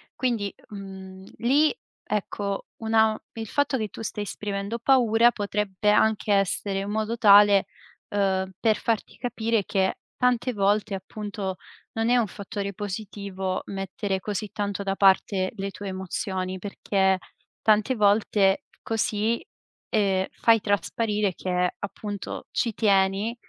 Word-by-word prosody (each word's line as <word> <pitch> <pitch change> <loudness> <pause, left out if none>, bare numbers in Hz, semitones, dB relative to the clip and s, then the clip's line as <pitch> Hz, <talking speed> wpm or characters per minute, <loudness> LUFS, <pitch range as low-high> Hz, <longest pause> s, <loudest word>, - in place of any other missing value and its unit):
Quindi, 230 -6 -1 0.2
mhmm, 190 -2 -9
lì, 285 +6 +3 0.3
ecco, 200 -1 -3 0.2
una 220 -1 +3 0.2
il 225 -1 -6
fatto 285 +1 +1
che 215 -3 -2
tu - - -9
stai 210 -1 -3
esprimendo 205 +2 -4
paura, 235 -2 +4
potrebbe 210 -1 0
anche 215 0 +2
essere 195 0 +1
in 195 +1 -4
modo 220 +2 -1
tale, 205 -2 +7 0.5
uhm, 190 -2 +1
per 220 -2 +3
farti 225 0 -2
capire 230 -3 0
che 190 -1 +1 0.2
tante 250 0 +1
volte, 205 0 +1
appunto, 200 0 -5 0.4
non 225 +1 +1
è 245 - +5
un 235 -3 +2
fattore 200 +1 -5
positivo 200 -2 -4
mettere 195 0 -3
così 210 0 -3
tanto 205 -2 -2
da 195 0 -1
parte 190 -1 +3
le 195 -1 -4
tue 200 0 -8
emozioni, 185 0 -3
perché 190 -1 +1 0.5
tante 215 +4 +3
volte 205 -2 +3 0.2
così, 225 0 0 0.5
ehm, 195 -3 +2
fai 225 -2 +3
trasparire 205 0 0
che 180 0 -1
appunto 205 0 -6
ci 230 -3 0
tieni, 200 +2 +2
205 Hz, 130 wpm, -25 LUFS, 195-220 Hz, 0.5 s, tale